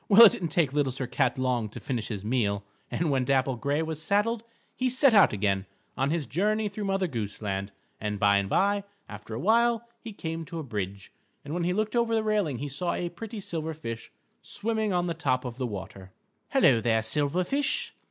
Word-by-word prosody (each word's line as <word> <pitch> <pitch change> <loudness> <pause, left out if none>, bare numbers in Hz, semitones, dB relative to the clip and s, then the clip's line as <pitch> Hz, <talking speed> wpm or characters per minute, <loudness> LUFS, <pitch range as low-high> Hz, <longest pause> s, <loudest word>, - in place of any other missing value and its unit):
Well, 215 +3 +10
it 210 - +8
didn't 175 - -3
take 150 -3 +1
Little 145 -3 +1
Sir 130 +1 -3
Cat 125 +1 0
long 125 -4 0
to - - -8
finish 120 -5 -3
his 105 -3 -5
meal, 105 -4 0 0.3
and 165 -3 0
when 130 -2 +2
Dapple 130 0 +2
Gray 140 +5 0
was 160 -1 -3
saddled, 210 +7 +1 0.3
he 255 0 +1
set 255 0 +4
out 205 -3 +7
again 100 -2 0 0.3
on 135 +1 +1
his 160 -1 0
journey 210 - +1
through 205 +1 -5
Mother 195 -1 +1
Goose 115 - -4
Land, 100 -1 -3 0.3
and 105 -1 -3
by 100 0 +5
and 100 -1 -1
by, 200 - +2 0.2
after 105 +1 -8
a - - -3
while, 235 - +3
he 230 - -8
came 165 -4 -4
to 170 +1 -7
a 160 - -3
bridge, 100 -5 -5 0.3
and 145 - -5
when 170 0 -1
he 180 - +1
looked 215 +3 -1
over 235 -1 +2
the 220 - +1
railing, 205 - +1
he 145 +4 -4
saw 170 +6 -2
a 175 - -2
pretty 220 +5 -7
silver 160 -4 -4
fish 115 -7 -7 0.3
swimming 220 0 -1
on 175 -1 +1
the 170 - -1
top 135 -5 0
of 120 -1 -5
the 130 - 0
water. 95 -2 -8 0.4
"Helloa 115 - +5
there, 110 -1 +2
silver 145 +9 +1
fish! 275 +9 -1
150 Hz, 215 wpm, -28 LUFS, -, 0.4 s, Well